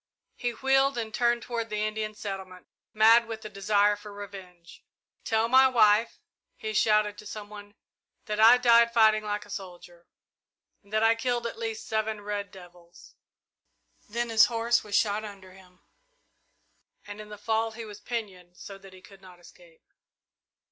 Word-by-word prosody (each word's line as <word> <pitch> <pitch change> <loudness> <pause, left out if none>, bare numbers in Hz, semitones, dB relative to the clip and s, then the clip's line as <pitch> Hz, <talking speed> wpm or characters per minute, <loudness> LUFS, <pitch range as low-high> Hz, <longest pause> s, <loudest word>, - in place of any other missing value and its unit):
He 245 - -3
wheeled 270 +1 +1
and 220 -2 -4
turned 240 0 +1
toward 230 -2 -4
the 210 0 -2
Indian 215 0 -4
settlement, 190 -3 -8 0.3
mad 225 +2 +5
with 225 -1 -7
the 215 - -7
desire 205 +1 +1
for 205 0 -12
revenge. 190 -4 -12 0.4
"Tell 225 0 0
my 260 +2 +6
wife," 225 -3 +3 0.4
he 215 0 -5
shouted 210 -1 +2
to 210 - -11
some 210 -1 -8
one, 205 -1 -12 0.5
"that 210 0 -4
I 230 +3 +8
died 235 -1 +4
fighting 220 -2 +4
like 210 0 -4
a - - -15
soldier, 175 -2 -10 0.7
and 200 - -25
that 215 +1 +1
I 225 0 +5
killed 240 +1 -2
at 230 - -5
least 225 -1 -5
seven 220 -1 -2
red 205 -1 -5
devils!" 175 -2 -16 1.0
Then 235 +2 -3
his 225 -1 +6
horse 235 0 0
was 205 -1 -4
shot 210 0 +1
under 195 -3 -11
him, 185 -1 -19 1.2
and 205 +1 -9
in 210 - -12
the 210 - -9
fall 220 +2 -1
he 230 0 -8
was 210 -1 -11
pinioned 185 -7 -7
so 195 -1 -11
that 195 -1 -15
he 185 - -16
could 195 -1 -17
not 180 -2 -16
escape. - - -20
215 Hz, 170 wpm, -27 LUFS, 200-230 Hz, 1.2 s, I